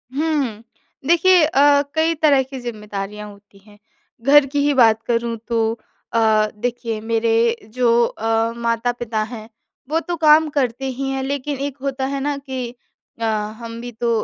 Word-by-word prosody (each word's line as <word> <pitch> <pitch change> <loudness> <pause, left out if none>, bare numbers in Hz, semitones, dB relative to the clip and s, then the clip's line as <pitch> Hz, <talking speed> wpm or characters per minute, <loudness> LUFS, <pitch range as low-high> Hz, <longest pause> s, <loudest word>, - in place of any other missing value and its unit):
हुँ। 285 -8 -1 0.4
देखिए 345 +1 +5
अ, 285 -1 +4
कई 320 +1 +2
तरह 285 -3 +5
की 265 0 -8
ज़िम्मेदारियाँ 210 -3 -6
होती 200 0 -19
हैं। 205 -1 -18 0.4
घर 285 +2 +6
की 285 +1 -2
ही 290 - +3
बात 225 -3 +4
करूँ 235 -1 0
तो 225 -1 0 0.3
अ, 230 - +3 0.4
देखिए 230 -1 -3
मेरे 230 +1 +1 0.2
जो 240 -2 +3
अ, 225 +1 -1
माता-पिता 235 -1 -1
हैं। 220 -1 -8 0.4
वो 320 +1 +1
तो 345 +1 -4
काम 310 0 +5
करते 270 -3 -1
ही 270 +1 -3
हैं। 270 0 -2
लेकिन 280 +1 -3
एक 280 0 -4
होता 270 -1 -2
है 275 +1 -2
ना 285 0 -1
कि 260 -3 -5 0.5
अ, - - 0 0.3
हम 230 0 -7
भी 245 - -7
तो 235 +1 -2
245 Hz, 160 wpm, -20 LUFS, 230-280 Hz, 0.5 s, घर